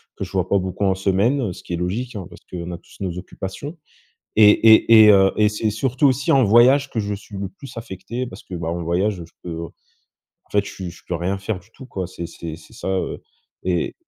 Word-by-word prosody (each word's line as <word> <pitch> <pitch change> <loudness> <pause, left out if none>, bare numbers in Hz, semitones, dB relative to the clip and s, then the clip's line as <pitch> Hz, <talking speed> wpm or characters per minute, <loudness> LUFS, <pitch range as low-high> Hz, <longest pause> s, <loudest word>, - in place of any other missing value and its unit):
que - - -5
je - - -13
vois - - 0
pas 100 - +3
beaucoup 95 +2 -3
en 95 - +3
semaine, 100 +8 +1
heu, 100 -7 -2
ce - - -12
qui 85 - -6
est - - +1
logique 110 +8 -3
hein 95 -4 -5
parce - - -14
qu'on 90 -1 -5
a 85 - -5
tous - - -19
nos 90 -3 -3
occupations 95 - -7 0.6
et 105 -1 +8
et 110 0 +7
et - - +8
heu, 95 -1 +5
et 105 -1 +4
c'est 110 +1 -1
surtout 130 +5 0
aussi 135 +1 +1
en 135 -2 +5
voyage 125 +6 +5
que 115 - -2
je 105 0 -2
suis 100 0 -10
le 100 -1 -3
plus 125 +8 -12
affecté 115 +3 -5
parce 95 0 -11
que 95 - -12
bah 85 -2 -4
en 85 0 -3
voyage, 95 +5 +1
je - - -22
peux, 85 -1 -5
en - - -13 0.6
fait 100 -1 +2
je - - -7
suis 90 -2 -6
je 85 - -15
peux 90 - -3
rien 95 +4 -2
faire 100 0 -3
du 95 - -23
tout 130 - -11
quoi. 95 -7 -4
C'est 85 -1 -7
c'est 80 -1 -7
c'est 80 - -17
ça, - - -6
heu, 95 -1 -2 0.4
et 90 -2 0
100 Hz, 250 wpm, -21 LUFS, 90-115 Hz, 0.6 s, et